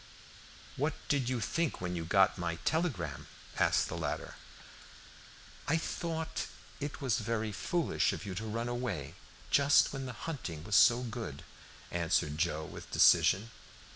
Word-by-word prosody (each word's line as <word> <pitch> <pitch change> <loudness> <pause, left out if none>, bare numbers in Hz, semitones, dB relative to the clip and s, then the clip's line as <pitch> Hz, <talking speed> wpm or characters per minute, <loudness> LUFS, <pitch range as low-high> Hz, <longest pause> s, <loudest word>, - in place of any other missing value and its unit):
"What 145 +3 0
did 135 -4 +1
you 125 -2 0
think 160 +8 -1
when 90 0 -3
you 85 -1 -3
got 95 +4 +4
my 85 -1 -1
telegram?" 115 - -1 0.3
asked - - +3
the - - -5
latter. - - -3 1.3
"I 160 - +3
thought 160 -1 -3 0.3
it 145 0 -5
was 125 -3 +1
very 110 -1 -1
foolish 170 - 0
of - - -6
you 100 - -4
to 100 +5 -4
run 115 +2 -2
away 115 - -3 0.4
just 140 0 +5
when 135 -1 -4
the 125 - -5
hunting 90 - -5
was 105 +2 -1
so 120 +6 +6
good," 115 - -5 0.5
answered 80 -3 0
Joe 80 -2 0
with - - -10
decision. 110 +5 +5
115 Hz, 145 wpm, -32 LUFS, 90-140 Hz, 1.3 s, so